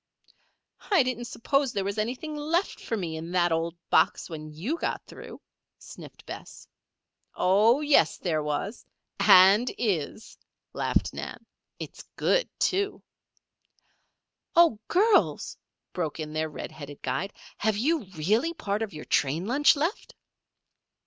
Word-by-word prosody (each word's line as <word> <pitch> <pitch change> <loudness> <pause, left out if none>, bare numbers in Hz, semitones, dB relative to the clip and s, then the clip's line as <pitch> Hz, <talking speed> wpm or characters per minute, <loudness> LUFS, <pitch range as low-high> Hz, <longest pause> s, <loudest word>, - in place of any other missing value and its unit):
"I 390 -9 +5
didn't 245 -1 -3
suppose 275 +3 0
there 200 - -1
was 200 +2 -3
anything 255 +8 -3
left 320 +6 -1
for 225 - -3
me 165 -5 -4
in 165 +2 -7
that 175 -1 +2
old 165 +1 -1
box - - +2
when 155 -1 -7
you 215 - -3
got - - -3
through," - - -11 0.4
sniffed - - -13
Bess. - - -10 0.7
"Oh, 215 +9 +4
yes 290 - +3
there 160 -4 -1
was 150 +9 -3 0.4
and 195 +6 +7
is," 205 -2 -3 0.3
laughed - - 0
Nan. - - -7 0.3
"It's - - -8
good, - - +1
too." 395 +2 0 1.5
"Oh, 335 -11 +5
girls!" 410 +4 +2 0.4
broke 165 -3 -3
in 155 -1 -5
their 155 0 -1
red 150 - -7
headed 145 -2 -10
guide. 150 +10 -2 0.3
"Have 215 -1 +1
you 300 +2 +1
really 215 - +1
part 210 -8 -2
of 220 -3 -3
your 150 - -8
train 150 +5 +1
lunch 280 +8 +4
left?" 325 +9 -3
210 Hz, 135 wpm, -27 LUFS, -, 1.5 s, and